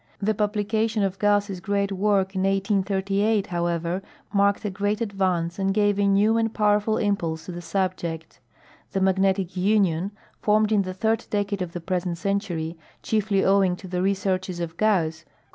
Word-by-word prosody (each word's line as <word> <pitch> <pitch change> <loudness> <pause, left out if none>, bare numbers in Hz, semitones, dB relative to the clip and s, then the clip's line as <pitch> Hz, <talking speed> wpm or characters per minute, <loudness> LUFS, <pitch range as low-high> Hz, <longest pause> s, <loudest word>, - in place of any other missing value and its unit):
The 215 +2 +1
publication 215 +1 0
of 195 0 -2
Gauss' 205 -2 +1
great 200 0 -1
work 195 -1 +1
in 190 - -1
1838, 195 +1 +1
however, 170 +1 -1 0.3
marked 200 +1 +2
a 205 - -1
great 205 +2 -1
ad 225 -4 -3
vance 180 -2 0
and 195 0 0
gave 205 -1 +2
a 200 - +3
new 205 +3 +3
and 225 -1 0
powerful 210 0 +2
impulse 170 -6 -1
to - - -6
the 175 0 -6
subject. 175 -2 -3 0.5
The 195 - +1
Mag 190 0 +2
netic 190 -1 +1
Union, 190 -2 +2 0.3
fonned 215 0 +3
in 210 -2 +4
the 185 -1 -5
third 220 +3 0
decade 205 -1 -1
of 175 -2 -4
the 175 - -5
present 180 -1 -2
century, 175 -4 -2 0.2
chiefly 210 -3 +1
owing 195 -2 +3
to 185 - -11
the 180 0 -2
researches 190 -2 -1
of 165 -1 -4
Gauss, 170 -6 +1
cau. - - -36
195 Hz, 175 wpm, -24 LUFS, 180-205 Hz, 0.5 s, in